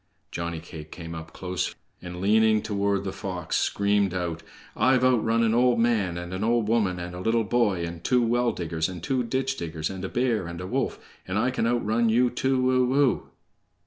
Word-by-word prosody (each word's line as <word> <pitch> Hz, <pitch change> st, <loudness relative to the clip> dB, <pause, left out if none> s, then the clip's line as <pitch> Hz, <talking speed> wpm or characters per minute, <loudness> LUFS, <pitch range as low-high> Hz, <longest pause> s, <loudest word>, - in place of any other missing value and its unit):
Johnny 85 Hz, -1 st, -4 dB
cake 80 Hz, -2 st, -10 dB
came 85 Hz, -2 st, -7 dB
up 80 Hz, 0 st, -8 dB
close, 90 Hz, -1 st, -3 dB, 0.3 s
and 90 Hz, 0 st, -7 dB
leaning 110 Hz, +2 st, +3 dB
toward 100 Hz, -1 st, 0 dB
the 95 Hz, -, -3 dB
fox 90 Hz, -2 st, -4 dB
screamed 100 Hz, -2 st, +1 dB
out: 85 Hz, -2 st, -3 dB, 0.3 s
"I'VE 130 Hz, -1 st, +3 dB
OUTRUN 115 Hz, -2 st, +3 dB
AN 115 Hz, -1 st, +2 dB
OLD 120 Hz, 0 st, +4 dB
MAN, 110 Hz, -7 st, +1 dB
AND 90 Hz, +1 st, -6 dB
AN 95 Hz, +3 st, -3 dB
OLD 115 Hz, -1 st, +2 dB
WOMAN, 105 Hz, -5 st, +1 dB
AND 90 Hz, 0 st, -6 dB
A 90 Hz, -, -7 dB
LITTLE 115 Hz, +4 st, +1 dB
BOY, 105 Hz, -6 st, +1 dB
AND 85 Hz, 0 st, -7 dB
TWO 125 Hz, -1 st, +3 dB
WELL 120 Hz, +1 st, +2 dB
DIGGERS, 80 Hz, -1 st, -2 dB
AND 90 Hz, -2 st, -8 dB
TWO 130 Hz, +3 st, 0 dB
DITCH 130 Hz, +3 st, -1 dB
DIGGERS, 80 Hz, -1 st, -4 dB
AND 95 Hz, -1 st, -7 dB
A 95 Hz, -, -3 dB
BEAR, 120 Hz, -7 st, 0 dB
AND 85 Hz, 0 st, -7 dB
A 90 Hz, -, -5 dB
WOLF, -, -, -1 dB, 0.3 s
AND 95 Hz, +2 st, -2 dB
I 120 Hz, +4 st, +2 dB
CAN 115 Hz, -2 st, 0 dB
OUTRUN 115 Hz, -1 st, +1 dB
YOU 120 Hz, +2 st, +3 dB
TOO 130 Hz, 0 st, +1 dB
O 130 Hz, +2 st, +2 dB
O!" 140 Hz, -3 st, +2 dB
105 Hz, 205 wpm, -26 LUFS, 90-120 Hz, 0.3 s, OLD